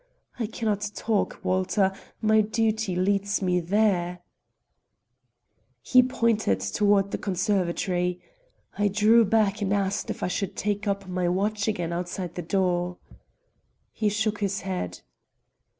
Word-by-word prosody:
I 225 - -1
can 225 +1 -6
not 205 -1 0
talk, 220 -3 -1
Walter; 190 +1 +1 0.3
my 220 0 +5
duty 220 -2 0
leads 200 +2 +1
me 180 -2 +1
there." 180 -1 +1 1.6
He 255 - +6
pointed 230 - +1
toward 200 - +2
the - - -3
conservatory. 180 -2 0 0.6
I 205 - +3
drew 215 +3 +5
back 210 -1 +2
and 195 -1 0
asked 200 -1 0
if - - -4
I - - +1
should 190 +1 -3
take 205 +1 -2
up 200 -1 -1
my 180 -1 -1
watch 205 +3 0
again 175 -6 -1
outside 175 0 -4
the 175 - -4
door. 180 0 0 0.9
He 215 -2 0
shook 210 +1 -1
his 200 -1 -1
head. 185 - -4
200 Hz, 135 wpm, -26 LUFS, 180-210 Hz, 1.6 s, He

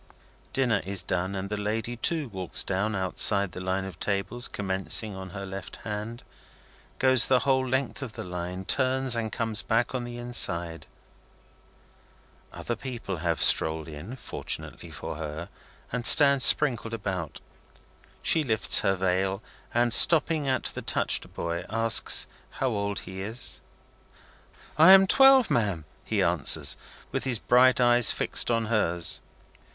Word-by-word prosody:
Dinner 125 -7 0
is 95 0 -1
done, 90 +2 -3
and 95 0 -5
the 105 +1 -5
lady, 110 +3 -4
too, 155 +4 -1
walks 95 -4 0
down 100 +3 -3
outside 95 +1 +1
the 90 - -9
line 95 +1 -3
of 95 -3 -11
tables 105 +4 -3
commencing 95 +1 +1
on 95 0 -9
her 100 +2 -8
left 95 0 -9
hand, 110 +2 -7 0.7
goes 130 -3 +4
the 130 -2 +2
whole 130 -1 0
length 130 +1 -3
of 125 -5 -8
the - - -8
line, 90 +1 -7
turns, 130 0 +1
and 115 -2 -4
comes 110 -2 -1
back 115 +2 -1
on 125 -2 -4
the 120 0 -8
inside. 85 -9 -2 1.6
Other 120 - -6
people 115 -6 -7
have 85 0 -2
strolled 80 0 +1
in, 80 - -9
fortunately - - -6
for - - -8
her, 80 +3 -7 0.4
and 120 0 -4
stand 140 +1 +7
sprinkled 120 -4 +5
about. 95 -8 -6 0.8
She 160 - +1
lifts 110 -4 +1
her 95 - 0
veil, 95 +2 -2 0.3
and, 120 -1 0
stopping 155 -1 +4
at 130 -2 -1
the - - -3
touched - - -1
boy, 85 0 -4
asks 115 0 +3 0.2
how 130 - -3
old 100 -3 -4
he 95 0 -9
is? 110 +5 -4 1.2
"I 165 +4 +8
am 195 0 +6
twelve, 270 +3 +4
ma'am," 100 -9 -1 0.2
he 105 -3 -2
answers, 85 -3 +3 0.4
with - - -4
his 130 -3 0
bright 125 +3 +3
eyes 120 -1 +4
fixed - - +1
on 115 -1 -1
hers. 90 -6 0
110 Hz, 145 wpm, -25 LUFS, 95-125 Hz, 1.6 s, I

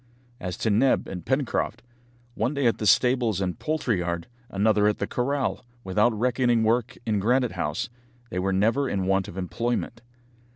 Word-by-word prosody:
As 90 -6 -4
to 110 - 0
Neb 125 +6 +3
and 90 -3 -6
Pencroft, 130 - -1 0.5
one 120 +5 -1
day 140 -2 0
at 115 - +2
the 105 - 0
stables 120 -2 +3
and 90 -2 -2
poultry 150 - 0
yard, 85 -1 -2 0.2
another 105 0 +3
at 105 - +1
the - - -1
corral, 135 +2 -1 0.2
without 105 +5 +2
reckoning 120 -1 +2
work 115 +1 +1
in 105 -2 +1
Granite 125 +4 +2
House, - - -2 0.4
they 90 - -2
were 95 +1 0
never 115 +8 +2
in 95 -2 -1
want 95 0 +1
of 85 - -9
employment. 115 +4 -2
110 Hz, 170 wpm, -25 LUFS, 95-125 Hz, 0.5 s, Neb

